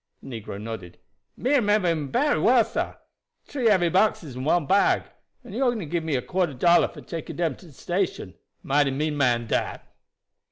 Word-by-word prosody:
The 120 -4 -7
negro 100 -1 -7
nodded. 105 -5 -7 0.4
"Me 255 - -1
remember 210 -7 +3
him 155 -4 -1
bery 290 - +2
well, 235 0 +4
sah. - - -3 0.5
Tree 260 -5 -1
heavy 185 -5 +4
boxes 185 - +1
and 130 +3 -4
one 170 -1 +2
bag, 195 +6 +3 0.4
and - - -11
he - - -3
only 240 -8 +1
give 165 +2 -2
me 150 -5 0
quarter 175 -4 -1
dollar 170 +7 +4
for - - -12
taking 165 -3 -7
dem 165 -5 -1
to 180 - -15
de - - -15
station. 175 - -3 0.3
Mighty 145 0 +2
mean 150 +3 -1
man 120 -4 +2
dat." - - -2
165 Hz, 185 wpm, -25 LUFS, 135-200 Hz, 0.5 s, well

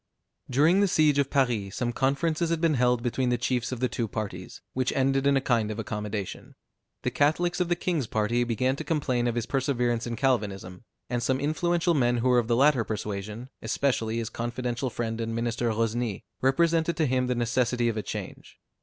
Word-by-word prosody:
During 155 +9 +4
the 200 - +4
siege 155 -5 +3
of 140 -1 +1
Paris, 120 -8 0
some 120 -1 -1
conferences 155 +6 0
had 165 -1 0
been 165 -1 +2
held 125 -2 +2
between 125 +1 0
the 120 - +2
chiefs 120 +1 -1
of 125 -1 -4
the 130 - +3
two 115 -2 -2
parties, 100 -4 -6
which 130 0 0
ended 135 +1 +2
in 140 -1 +4
a - - +1
kind 115 -5 +1
of 110 - -4
accommodation. 105 -2 -5 0.5
The 125 - 0
Catholics 155 +7 +1
of 180 -1 0
the 175 - +3
king's 170 -8 -1
party 110 +3 +1
began 125 +3 0
to - - -4
complain 130 -6 0
of 120 - -1
his 120 -2 -1
perseverance 125 -4 0
in 120 - -3
Calvinism; 105 -7 -1 0.2
and 120 0 -2
some 130 +2 +1
influential 170 +4 +1
men 120 -5 +2
who 125 +2 +1
were 125 -1 +5
of 115 - -2
the 120 - +2
latter 135 -1 +4
persuasion, 105 +3 -5
especially 115 -5 0
his 115 -2 -3
confidential 120 +2 -3
friend 115 -1 -3
and 115 0 -3
minister 120 0 -1
Rosny, 115 -1 -1 0.2
represented 165 +5 +2
to 160 - +2
him 130 -1 +1
the 125 - 0
necessity 120 0 +1
of 115 - 0
a 110 - -1
change. - - -7
125 Hz, 200 wpm, -27 LUFS, 115-140 Hz, 0.5 s, were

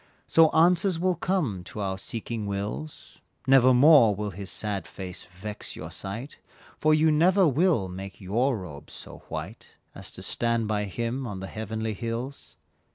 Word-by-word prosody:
So 165 -1 +5
answers 175 +2 +3
will 185 +1 +2
come 165 - -1
to 105 - -8
our 95 -1 -2
seeking 115 0 -5
wills, 100 +10 -5 0.2
Nevermore 130 -2 +7
will 105 +1 -3
his 95 +1 -7
sad 100 -5 -3
face 90 -2 -7
vex 95 +4 -6
your - - -7
sight, 115 +9 -6 0.4
For 155 - +3
you 155 +1 +4
never 180 +4 +4
will 150 - +2
make 95 +1 -8
your 115 +7 +1
robes 80 -7 -9
so - - -8
white - - -7 0.2
As - - -7
to - - -7
stand 115 -2 0
by 105 -1 0
him 120 +6 -3
on 100 -4 -5
the 95 - -5
heavenly 110 +1 -4
hills. 115 +5 -5
115 Hz, 160 wpm, -27 LUFS, 100-150 Hz, 0.4 s, Nevermore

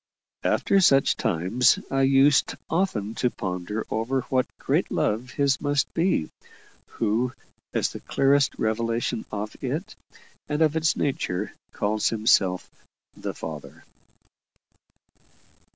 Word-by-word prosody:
After 195 - +2
such 140 -6 +4
times 95 +9 +2
I 135 0 +1
used 135 +1 +4 0.2
often 120 - 0
to 125 - +1
ponder 95 +2 -4
over 125 +4 0
what 130 -1 +2
great - - 0
love 115 +4 -1
His 140 +1 +1
must 145 -2 0
be, 165 - +1 0.6
who, 115 +3 -1 0.4
as - - 0
the - - -8
clearest 135 0 +2
revelation 115 +1 -1
of 105 0 -4
it, - - -3 0.5
and 150 +2 +2
of 155 0 +2
its 160 0 +2
nature, 105 -8 -2 0.2
calls 105 +1 0
Himself 105 -5 +2 0.5
"the - - -5
Father." 80 -3 -8
120 Hz, 115 wpm, -25 LUFS, 105-140 Hz, 0.6 s, such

